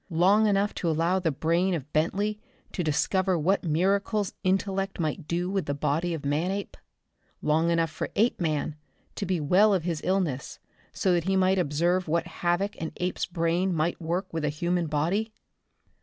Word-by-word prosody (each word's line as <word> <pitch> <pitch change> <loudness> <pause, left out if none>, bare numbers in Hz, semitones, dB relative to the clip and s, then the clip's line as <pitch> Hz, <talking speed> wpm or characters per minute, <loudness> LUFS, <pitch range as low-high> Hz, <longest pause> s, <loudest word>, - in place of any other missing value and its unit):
Long 190 +6 +4
enough 205 0 +2
to 170 - +1
allow 165 +4 +1
the 175 -3 0
brain 170 +5 +1
of 150 -2 -7
Bentley 200 +7 0 0.3
to 180 - -2
discover 185 +4 +1
what 185 +6 +1
miracles 195 +5 +1
intellect 195 +1 0
might 155 0 -2
do 175 +1 -1
with 195 0 -2
the 145 - -1
body 165 +5 0
of 145 - -7
Manape? 180 +8 -1 0.7
Long 160 +2 +2
enough 165 -2 +1
for - - -4
Apeman 160 -9 0 0.4
to - - -4
be 185 -2 0
well 195 +8 +4
of 180 - -1
his 165 -3 -2
illness, 180 -9 -1 0.3
so 185 - +1
that 170 -1 +1
he 190 0 +1
might 190 0 +3
observe 175 +3 +1
what 165 +2 +1 0.2
havoc 175 +3 0
an 160 - -4
ape's 180 +1 -2
brain 175 +1 0
might 165 +3 -1
work 170 +4 -1
with 165 -1 -2
a 150 - +1
human 170 +3 -1
body? 170 +9 0
175 Hz, 170 wpm, -27 LUFS, 160-190 Hz, 0.7 s, Long